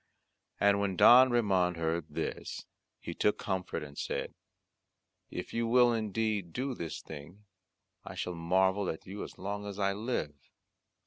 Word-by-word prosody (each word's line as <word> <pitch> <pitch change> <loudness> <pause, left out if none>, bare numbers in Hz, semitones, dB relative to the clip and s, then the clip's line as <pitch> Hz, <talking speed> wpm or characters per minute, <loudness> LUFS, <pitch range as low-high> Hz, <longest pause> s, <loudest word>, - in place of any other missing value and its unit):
And 100 0 +4
when 100 -2 0
Don 125 +8 +8
Ramond 95 -7 +2
heard 80 0 -1
this, - - -4 0.3
he - - -6
took 105 - +1
comfort 95 -4 -3
and 70 -1 -10
said, - - -3 1.0
"If - - -6
you 115 0 0
will 120 0 +5
indeed 110 -4 -1
do 130 +1 -2
this 85 - -6
thing 80 +7 -10 0.6
I - - -8
shall 90 - -3
marvel 95 +3 +2
at 80 - -5
you 100 +2 -6
as - - -10
long 100 +2 -4
as 100 -1 -6
I 100 -1 +1
live." 105 - -2
100 Hz, 150 wpm, -31 LUFS, 90-110 Hz, 1.0 s, Don